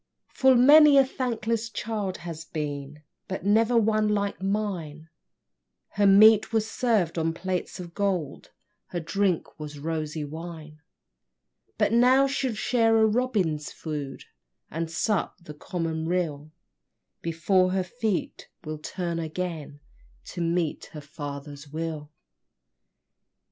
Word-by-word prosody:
Full 265 -1 +4
many 290 +3 +8
a 270 - +7
thankless 230 -3 -2
child 210 -3 -3
has 165 -2 -6
been, 150 -1 -5 0.2
But 190 0 -5
never 225 +4 +3
one 215 -1 +2
like 200 -2 -1
mine; 185 -6 -3 0.8
Her 205 0 +2
meat 215 +3 +7
was 220 -1 +1
served 215 -9 0
on 165 0 -1
plates 185 +1 -3
of 170 -2 -8
gold, 185 -8 -2 0.4
Her 175 - -4
drink 185 0 -1
was 150 -1 -7
rosy 155 0 -3
wine; 155 0 -9 1.0
But - - +2
now 255 +3 +5
she'll 270 -3 -1
share 225 0 +2
the 220 - +5
robin's 210 - 0
food, 145 -4 -6 0.5
And 165 +1 -3
sup 195 +4 -1
the 150 - -9
common 160 +1 -3
rill, 155 -4 -2 0.7
Before 185 +3 +2
her 190 0 0
feet 215 0 -3
will 155 -1 -6
turn 170 +1 -4
again 160 -3 -5 0.5
To 175 - -4
meet 170 -2 -1
her 150 - -7
father's 145 0 -8
will! 155 0 -5
175 Hz, 120 wpm, -26 LUFS, 155-215 Hz, 1.0 s, many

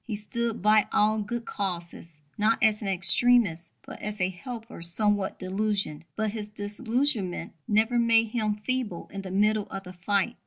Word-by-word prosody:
He 225 - -4
stood 225 0 -3
by 215 0 +5
all 215 +1 +3
good 230 +3 -4
causes, 170 -5 -5
not 220 +2 +2
as 215 -1 +3
an 205 - -4
extremist, 190 -2 +4
but - - -10
as 210 0 -5
a 180 0 +1
helper 225 +1 -8
somewhat 200 +3 0
disillusioned. 195 -4 -2
But 220 -1 -1
his 210 -1 -6
disillusionment 210 0 0
never 220 +3 +2
made 230 -1 +3
him 215 -2 -1
feeble 215 -4 -4
in 195 - -4
the 190 - -8
middle 210 +2 +1
of 195 0 -6
the 180 -1 -10
fight. 200 +5 0
210 Hz, 165 wpm, -27 LUFS, 190-225 Hz, -, by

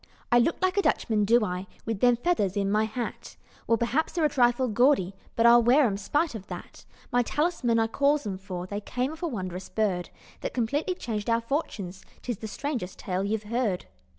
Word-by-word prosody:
"I 240 - +6
look 285 +8 +2
like 370 +1 +2
a - - +5
Dutchman, 215 - +1
do 230 +1 +4
I? 180 0 -4 0.2
With 225 -3 -2
them 245 +1 +5
feathers 230 - 0
in 200 0 +1
my 215 +1 +3
hat! 230 +2 -5 0.3
Well 230 - +3
p'r'aps 240 +8 0
they're 335 -3 +1
a - - +4
trifle 245 -1 +3
gaudy, 240 -4 +3 0.2
But 230 - +3
I'll 240 0 +8
wear 255 +5 +5
'em 205 -4 +1
'spite 290 +11 0
of 210 -4 -8
that. - - -9 0.3
My 245 0 +4
'talisman' 285 -3 0
I 225 - +3
calls 280 +5 +1
'em, 190 -2 -4
for 185 -2 -6
They 205 +2 -4
came 250 +6 -2
off 315 - -10
a 345 - 0
wondrous 185 - -5
bird, 185 -4 -1 0.3
That - - -5
completely 285 +9 0
changed 220 - -4
our 230 0 +3
fortunes: 215 - -3 0.2
'Tis 240 -4 -3
the 220 - -5
strangest 235 -6 -4
tale 185 0 -2
you've 215 +1 -1
heard. 215 -4 -1
230 Hz, 205 wpm, -27 LUFS, 200-260 Hz, 0.3 s, I'll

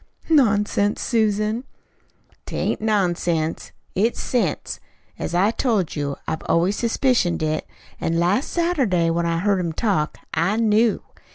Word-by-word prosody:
"Nonsense, 210 -7 +3
Susan!" 215 0 0 0.8
"'T - - -6
ain't - - -1
nonsense. 175 -6 0 0.2
It's 220 +5 +1
sense. 215 - -1 0.4
As 175 - -3
I 195 +5 +3
told 220 - 0
you, 145 -2 -2
I've 160 - -2
always 180 +5 +2
suspicioned 230 -8 +1
it, 155 0 -1 0.3
an' 165 0 -1
last 180 - +1
Saturday, 260 - +1
when 170 0 0
I 165 0 0
heard 195 +2 +1
him 170 -3 -2
talk, 165 -6 0 0.2
I 170 +6 +1
knew. 225 0 +2
200 Hz, 130 wpm, -22 LUFS, 170-225 Hz, 0.8 s, Nonsense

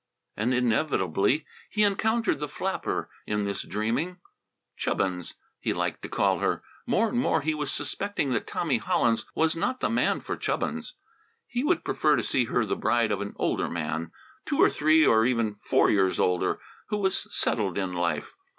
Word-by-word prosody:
And 110 +4 0
inevitably 120 - +1 0.2
he 210 - +2
encountered 220 0 +2
the 150 - -2
flapper - - -2 0.2
in 105 -1 0
this 100 -1 -2
dreaming; 120 - -2 0.6
"Chubbins," 90 -2 -2 0.2
he - - -1
liked - - -2
to - - -7
call - - +2
her. - - 0 0.2
More 225 - +3
and 240 - 0
more 160 - +2
he 155 +2 0
was 150 -2 -2
suspecting 200 -9 -2
that 115 - -1
Tommy 140 -9 0
Hollins 115 0 +1
was 160 0 +2
not 255 +10 -1
the - - 0
man - - +2
for - - -4
Chubbins. - - -2 0.5
He 245 0 -2
would 345 +3 +1
prefer 150 -1 +3
to 115 - 0
see 125 - +1
her 115 0 +1
the 105 - -1
bride 110 0 +1
of 100 -1 -1
an 100 - -4
older - - 0
man, 80 0 -3 0.3
two 285 - -2
or - - +6
three, 155 +1 +4
or 110 -3 +5
even 115 -3 +1
four, 105 - +2
years 95 -2 +2
older, 90 -1 +1 0.3
who 210 - 0
was 190 -2 0
settled 100 -6 0
in 95 -2 -1
life. 85 -1 -1
120 Hz, 180 wpm, -27 LUFS, 100-160 Hz, 0.6 s, or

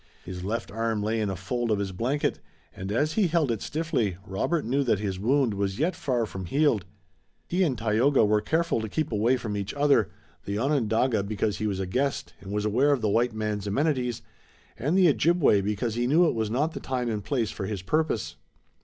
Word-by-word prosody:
His 90 -1 -6
left 110 +4 -3
arm 115 -1 -1
lay 110 +1 0
in 105 - 0
a 95 - -2
fold 115 +6 -2
of 105 - +2
his 100 -1 -2
blanket, 125 +10 -1 0.4
and, 95 +2 -5
as 145 +8 +1
he 210 -4 +3
held 160 -6 +1
it 110 - -2
stiffly, 135 - -1
Robert 110 - -1
knew 135 +5 +1
that 120 -5 +2
his 95 -2 -3
wound 125 +2 +2
was 100 -1 -2
yet 165 +6 0
far 125 -5 0
from 95 -3 -7
healed. 135 - +2 0.6
He 180 +2 0
and 145 -9 +2
Tayoga 115 +4 +3
were 105 0 +2
careful 160 +2 0
to 110 - -4
keep 155 +7 -2
away 115 +4 +2
from 110 -4 -4
each 100 +3 -4
other, 145 0 +3 0.4
the 100 +1 -2
Onondaga 115 -3 +1
because 100 -1 -2
he 110 - 0
was 100 -2 -2
a 95 - -1
guest 130 +9 -1
and 95 - -8
was 105 0 -1
aware 125 +7 +3
of 135 - -1
the 110 - +1
white 115 +3 +2
man's 105 -2 -2
amenities, 125 -1 0 0.5
and 145 - 0
the 185 -2 +6
Ojibway 145 - +4
because 105 +3 -1
he 120 +2 0
knew 160 +6 +5
it - - +1
was 110 -2 -1
not 145 +8 0
the - - -5
time 125 -2 -2
and 105 -3 -2
place 120 -4 -1
for 95 - -5
his 100 -3 -4
purpose. 105 - -1
115 Hz, 215 wpm, -27 LUFS, 105-140 Hz, 0.6 s, the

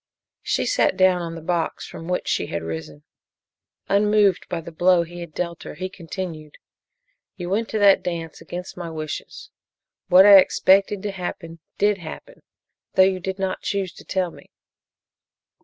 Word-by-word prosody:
She - - -1
sat - - +2
down 185 -1 +4
on 165 -1 -5
the 165 - -9
box 170 0 -2
from 165 - -9
which 180 0 -2
she - - 0
had 85 0 -4
risen. 80 -2 -7 0.8
Unmoved 205 -1 +3
by 175 - -2
the 165 +1 -9
blow 175 +1 +3
he 175 +1 -10
had 170 -2 -8
dealt 170 +1 -4
her, - - -8
he 185 +1 -4
continued: 165 -4 -7 0.8
"You 180 -1 -6
went 220 +3 0
to 220 - -2
that 200 -2 +5
dance 165 -3 -5
against 180 +1 -7
my 175 -2 -6
wishes. 155 -1 -7 0.6
What 185 +2 +7
I 200 -1 +10
expected 195 +1 +3
to 205 - -2
happen 170 -3 -6 0.2
did 205 -1 +2
happen, 175 - -10 0.5
though 190 - +7
you 190 0 +2
did 190 +1 -4
not 190 -1 -2
choose 195 -4 -2
to - - -14
tell 185 -2 -1
me. - - -16
180 Hz, 170 wpm, -23 LUFS, 165-195 Hz, 0.8 s, I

